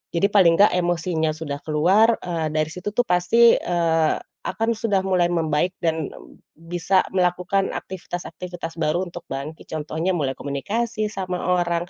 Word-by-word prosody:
Jadi 170 Hz, +4 st, +3 dB
paling 185 Hz, -5 st, +6 dB
nggak 205 Hz, -, +7 dB
emosinya 170 Hz, -2 st, 0 dB
sudah 150 Hz, -2 st, -5 dB
keluar, 190 Hz, +9 st, +3 dB
eee, 165 Hz, -3 st, -2 dB
dari 155 Hz, 0 st, 0 dB
situ 180 Hz, +5 st, -5 dB
tuh 245 Hz, -, +2 dB
pasti, 180 Hz, +7 st, +5 dB
eee, 165 Hz, -2 st, +1 dB, 0.3 s
akan 225 Hz, 0 st, -1 dB
sudah 205 Hz, -4 st, +1 dB
mulai 185 Hz, -2 st, +2 dB
membaik 165 Hz, 0 st, 0 dB
dan 160 Hz, -2 st, 0 dB, 0.5 s
bisa 175 Hz, +3 st, 0 dB
melakukan 180 Hz, +1 st, 0 dB
aktivitas-aktivitas 175 Hz, -2 st, -6 dB
baru 160 Hz, +2 st, 0 dB
untuk 175 Hz, 0 st, -10 dB
bangkit, 140 Hz, +4 st, -6 dB
contohnya 160 Hz, +4 st, -2 dB
mulai 140 Hz, -6 st, -1 dB
komunikasi 215 Hz, +10 st, -2 dB
sama 185 Hz, -3 st, -4 dB, 0.2 s
orang, 170 Hz, 0 st, -1 dB
175 Hz, 140 wpm, -23 LUFS, 160-190 Hz, 0.5 s, nggak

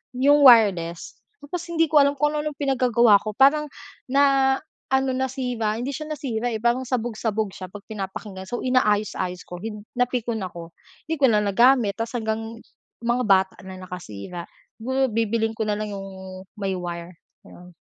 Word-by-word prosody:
yung 285 Hz, +3 st, +4 dB
wireless. 195 Hz, -9 st, +5 dB, 0.3 s
Tapos 335 Hz, +4 st, -5 dB
hindi 330 Hz, -1 st, +2 dB
ko 310 Hz, -, +3 dB
alam 280 Hz, 0 st, +5 dB
kung 295 Hz, +1 st, 0 dB
anu-anong 300 Hz, 0 st, -2 dB
pinag-gagawa 240 Hz, -6 st, +4 dB
ko 215 Hz, +1 st, -5 dB
parang 285 Hz, +4 st, +4 dB, 0.4 s
na 275 Hz, 0 st, +4 dB, 0.4 s
ano 265 Hz, -1 st, +2 dB
nasira, 250 Hz, -4 st, -2 dB
hindi 260 Hz, +3 st, -3 dB
siya 305 Hz, -, -5 dB
nasira 245 Hz, -5 st, -2 dB
eh 220 Hz, -, -3 dB
parang 240 Hz, +3 st, +1 dB
sabog-sabog 220 Hz, -4 st, -2 dB
siya 185 Hz, -1 st, -8 dB
pag 205 Hz, -, -8 dB
pinapakinggan. 195 Hz, -2 st, -6 dB
So 240 Hz, +5 st, -4 dB
inaayos-ayos 210 Hz, -7 st, 0 dB
ko 180 Hz, -, -7 dB
hin 210 Hz, 0 st, -7 dB
napikon 240 Hz, -4 st, -1 dB
ako 170 Hz, -2 st, -8 dB, 0.4 s
hindi 320 Hz, -, -1 dB
ko 275 Hz, -, +5 dB
na 210 Hz, -, +4 dB
nagamit. 225 Hz, 0 st, +4 dB
Tapos 230 Hz, 0 st, -4 dB
hanggang 225 Hz, 0 st, -3 dB, 0.4 s
mga 240 Hz, +1 st, 0 dB
bata 190 Hz, -2 st, +3 dB
na 190 Hz, 0 st, -9 dB
nakasira. 175 Hz, -, -8 dB, 0.3 s
Siguro 260 Hz, +3 st, 0 dB
bibilhin 225 Hz, 0 st, 0 dB
ko -, -, -3 dB
na 210 Hz, -, 0 dB
lang 215 Hz, 0 st, -4 dB
yung 190 Hz, -1 st, -8 dB, 0.2 s
may 195 Hz, -1 st, -1 dB
wire. 175 Hz, 0 st, -6 dB, 0.3 s
Ayun. 180 Hz, 0 st, -14 dB
225 Hz, 160 wpm, -23 LUFS, 195-260 Hz, 0.4 s, wireless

